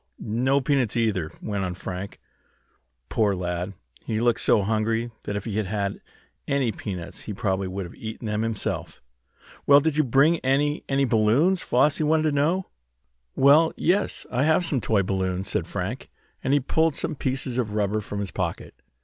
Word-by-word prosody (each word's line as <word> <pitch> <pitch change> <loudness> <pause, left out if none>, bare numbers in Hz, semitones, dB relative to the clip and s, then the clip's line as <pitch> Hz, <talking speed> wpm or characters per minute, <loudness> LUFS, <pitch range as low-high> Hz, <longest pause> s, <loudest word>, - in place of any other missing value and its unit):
"No 125 +6 +1
peanuts, 130 -5 +1
either," 100 -9 0
went 100 -3 -2
on 90 -1 -3
Frank. 90 +2 -6 0.9
Poor 105 - +1
lad! 90 +1 -3 0.3
He 110 -2 -2
looked 120 0 +2
so 105 - +3
hungry 110 +3 0
that 100 - -3
if 105 - -4
he 110 -2 -3
had 105 -3 0
had 100 0 -2 0.5
any 140 -4 +1
peanuts 95 -4 -7
he 105 - -6
probably 95 -2 -1
would 95 0 -4
have 85 - -10
eaten 110 +1 -7
them 105 0 -1
himself. 115 -2 -3 0.7
"Well, 140 0 +8
did 155 0 0
you 155 - +4
bring 140 +6 +4
any 145 +3 +1
any 135 0 +2
balloons?" 125 - +3
Flossie 145 +5 +2
wanted 155 +1 +3
to 155 - +2
know. 160 +7 0 0.6
"Well, 150 +4 +5
yes, 190 +4 +1
I 125 - 0
have 160 +4 +3
some 140 -6 0
toy 105 -3 +2
balloons," 95 -1 -2
said - - -1
Frank, - - -4 0.3
and 130 - 0
he 145 - +5
pulled 160 +3 +1
some 160 - -2
pieces 130 -2 -2
of 105 -4 -2
rubber 105 0 0
from 100 0 -5
his 100 - -4
pocket. - - -4
115 Hz, 175 wpm, -25 LUFS, 100-140 Hz, 0.9 s, Well